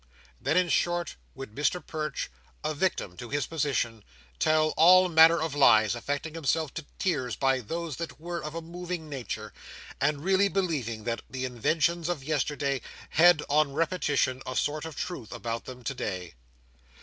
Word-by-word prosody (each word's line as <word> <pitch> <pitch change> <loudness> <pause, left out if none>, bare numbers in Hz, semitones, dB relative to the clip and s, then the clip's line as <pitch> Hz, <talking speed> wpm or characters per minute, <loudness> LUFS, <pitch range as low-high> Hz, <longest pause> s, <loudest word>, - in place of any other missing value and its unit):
Then, 160 - +1
in 180 -1 +3
short, 175 0 0 0.2
would 135 -5 -8
Mr 150 +5 0
Perch, 155 -1 -4 0.3
a 155 +1 -1
victim 145 - -1
to 120 - -8
his 145 -2 0
position, 135 -8 -1 0.4
tell 155 0 +3
all 185 +4 +6
manner 165 0 +7
of 160 -2 -2
lies; 110 -7 +5
affecting 145 +6 -3
himself 160 -1 -1
to 160 -3 -7
tears 140 -10 -1
by 135 -1 +2
those 165 +4 -4
that 170 -2 -6
were 170 +1 -5
of 150 +1 -6
a 165 - -4
moving 175 -1 -6
nature, 110 -6 -5 0.5
and 145 +1 +1
really 190 +2 +4
believing 150 - -2
that 115 +1 -2
the 130 -1 -3
inventions 160 +7 0
of 165 -6 -2
yesterday 145 -2 -1 0.3
had, 170 -2 +6
on 145 -1 +2
repetition, 145 -5 0
a 130 - -4
sort 150 +3 -1
of 160 -3 -7
truth 130 -10 -5
about 115 -1 -4
them 125 -1 -9
today. 95 -9 -4
150 Hz, 160 wpm, -28 LUFS, 130-165 Hz, 0.5 s, manner